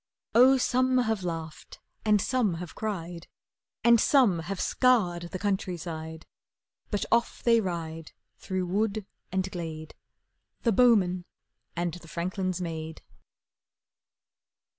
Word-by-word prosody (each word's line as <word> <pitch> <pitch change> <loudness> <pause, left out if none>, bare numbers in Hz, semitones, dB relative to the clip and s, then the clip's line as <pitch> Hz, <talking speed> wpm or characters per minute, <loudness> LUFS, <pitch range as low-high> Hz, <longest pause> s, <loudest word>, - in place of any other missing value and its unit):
Oh, 260 +3 +7
some 255 0 +2
have 220 -5 +1
laughed 165 -2 -6 0.2
and 210 -1 +4
some 220 -4 +1
have 165 -2 -7
cried, 175 -5 -5 0.6
And 235 -1 +6
some 240 - +4
have 175 +3 -5
scoured 180 -10 +2
the 185 - -4
countryside; 170 -5 -3 0.6
But 205 - -1
off 235 0 +1
they 230 -1 +4
ride 165 -4 -5 0.3
through 185 -1 -2
wood 205 +3 -1 0.3
and 190 0 -1
glade, 160 -3 -6 0.7
The 230 - +3
bowman 190 -6 +4 0.5
and 175 -1 -1
the 175 -2 -10
franklin's 185 +2 -2
maid. 160 -2 -5
185 Hz, 115 wpm, -28 LUFS, 170-220 Hz, 0.7 s, Oh